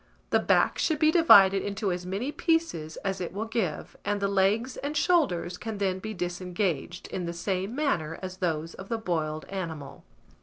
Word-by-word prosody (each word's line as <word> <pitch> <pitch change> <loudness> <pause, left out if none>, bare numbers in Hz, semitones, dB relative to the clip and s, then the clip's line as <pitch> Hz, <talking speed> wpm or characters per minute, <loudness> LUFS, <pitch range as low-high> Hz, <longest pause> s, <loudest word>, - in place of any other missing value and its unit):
The - - +4
back - - +2
should 315 - +1
be 310 -1 +4
divided 195 - +7
into 200 -1 -2
as 180 0 -4
many 205 +10 -2
pieces 320 - -1
as 195 -1 -1
it 175 - -3
will 210 +3 -3
give, 220 -9 -3
and 205 0 -1
the 200 - +1
legs 200 +6 +1
and 290 +2 -3
shoulders 195 - +1
can 220 -2 -5
then 190 -2 0
be 215 +3 -5
disengaged 175 -2 -3
in 180 -2 -4
the 170 - -3
same 190 +5 -2
manner 170 - -1
as 185 -1 -7
those 165 -3 -2
of 190 - -10
the 230 - 0
boiled 155 -7 -2
animal. 165 -7 -6
190 Hz, 185 wpm, -28 LUFS, 175-225 Hz, -, divided